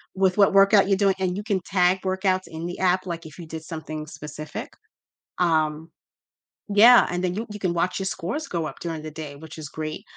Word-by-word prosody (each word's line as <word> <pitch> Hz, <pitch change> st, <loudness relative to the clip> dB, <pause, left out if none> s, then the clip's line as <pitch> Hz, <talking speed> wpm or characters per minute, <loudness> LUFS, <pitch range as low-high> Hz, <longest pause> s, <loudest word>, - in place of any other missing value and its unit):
with 190 Hz, 0 st, +2 dB
what 200 Hz, -1 st, +5 dB
workout 195 Hz, 0 st, +6 dB
you're 195 Hz, -, +3 dB
doing, 195 Hz, -1 st, +2 dB
and 185 Hz, -1 st, 0 dB
you 205 Hz, -, -4 dB
can 205 Hz, -3 st, 0 dB
tag 185 Hz, 0 st, +2 dB
workouts 185 Hz, 0 st, 0 dB
in 160 Hz, +1 st, -7 dB
the 175 Hz, -, -5 dB
app, 185 Hz, 0 st, +2 dB
like, 170 Hz, -2 st, -5 dB
if 155 Hz, +1 st, -11 dB
you 170 Hz, -, -8 dB
did 160 Hz, 0 st, -7 dB
something 155 Hz, -2 st, -6 dB
specific, 150 Hz, 0 st, -7 dB, 0.7 s
um 160 Hz, -2 st, +1 dB, 0.8 s
Yeah, 230 Hz, +4 st, +7 dB
and 180 Hz, 0 st, -2 dB
then 180 Hz, -1 st, -1 dB
you 225 Hz, +3 st, -4 dB
you 210 Hz, -, -8 dB
can 180 Hz, -3 st, 0 dB
watch 180 Hz, +3 st, 0 dB
your 190 Hz, -, -2 dB
scores 235 Hz, -, -3 dB
go 165 Hz, -3 st, -2 dB
up -, -, -8 dB
during 165 Hz, -2 st, -4 dB
the 155 Hz, -, -6 dB
day, 150 Hz, -2 st, -7 dB
which 160 Hz, +2 st, -11 dB
is 155 Hz, -2 st, -7 dB
great, 155 Hz, 0 st, -5 dB
180 Hz, 220 wpm, -24 LUFS, 160-190 Hz, 0.8 s, Yeah